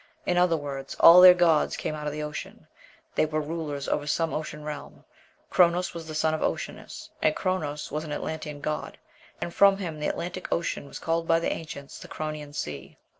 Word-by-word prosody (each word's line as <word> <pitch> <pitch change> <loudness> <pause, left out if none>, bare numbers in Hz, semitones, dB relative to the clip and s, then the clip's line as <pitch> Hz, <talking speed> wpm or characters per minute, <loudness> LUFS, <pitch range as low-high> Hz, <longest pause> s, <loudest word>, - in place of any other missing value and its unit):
In 180 - +1
other 175 -2 +3
words, 140 -2 -6
all 175 +2 +10
their 180 0 +10
gods 170 -4 +3
came - - -3
out 150 -1 -5
of - - -1
the 150 +1 -4
ocean; 150 0 -7 0.5
they 155 - +2
were 155 0 -1
rulers 150 -2 -4
over 145 0 -1
some 165 +1 0
ocean 155 -1 -5
realm; 150 -1 -7 0.5
Chronos 175 0 +3
was 165 -2 -7
the 155 - -6
son 155 0 +1
of 155 - -2
Oceanus, - - -4
and 155 - +3
Chronos 155 -6 -2
was 150 +2 -2
an 155 - -7
Atlantean 150 -1 -5
god, 155 +1 -4 0.4
and 170 - -4
from 195 +1 +6
him 165 -6 -5
the 150 - -1
Atlantic 180 +1 -4
Ocean 170 -4 -1
was - - -8
called 165 0 -1
by 165 0 +4
the 170 - -1
ancients 140 -4 -8
"the - - -10
Chronian 155 -1 -5
Sea." 75 - -6
155 Hz, 200 wpm, -27 LUFS, 150-170 Hz, 0.5 s, all